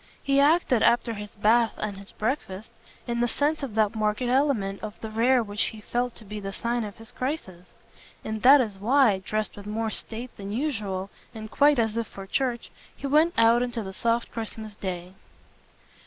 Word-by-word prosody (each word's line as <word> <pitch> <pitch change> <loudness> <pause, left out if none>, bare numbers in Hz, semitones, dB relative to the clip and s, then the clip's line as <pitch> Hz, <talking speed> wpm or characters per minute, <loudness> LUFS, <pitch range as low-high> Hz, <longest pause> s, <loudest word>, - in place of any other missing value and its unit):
He 275 0 +3
acted, 285 -5 +4
after 235 0 +3
his 210 -1 -8
bath 220 +2 +3
and 210 -2 -3
his 200 0 -11
breakfast, 215 -4 -3 0.3
in 235 0 -2
the 240 - +2
sense 295 +6 0
of 260 -7 -5
that 215 -2 +2
marked 215 +2 0
element 245 -6 +1
of 215 0 -7
the 220 - -6
rare 240 +3 +3
which 205 -1 0
he 220 - -5
felt 245 +2 -2
to 220 - -14
be 210 +1 -6
the 195 -1 -5
sign 235 +3 -1
of 205 -2 -7
his 225 +1 -8
crisis. 245 - -4 0.6
And 220 0 -3
that 275 +2 +8
is 210 -5 -4
why, 230 -2 +4
dressed 215 +3 -2
with 205 0 -10
more 220 +1 -2
state 235 +3 -5
than 200 0 -6
usual 205 -7 -2 0.2
and 220 0 -8
quite 290 0 +4
as 225 -2 +1
if 230 -2 -1
for 195 - -9
church, 245 +3 -2 0.2
he - - -8
went 310 +5 +3
out 230 +1 +5
into 240 -2 -2
the 190 -1 -7
soft 230 +3 0
Christmas 220 -2 -6
day. 180 -2 -5
225 Hz, 195 wpm, -26 LUFS, 210-250 Hz, 0.6 s, that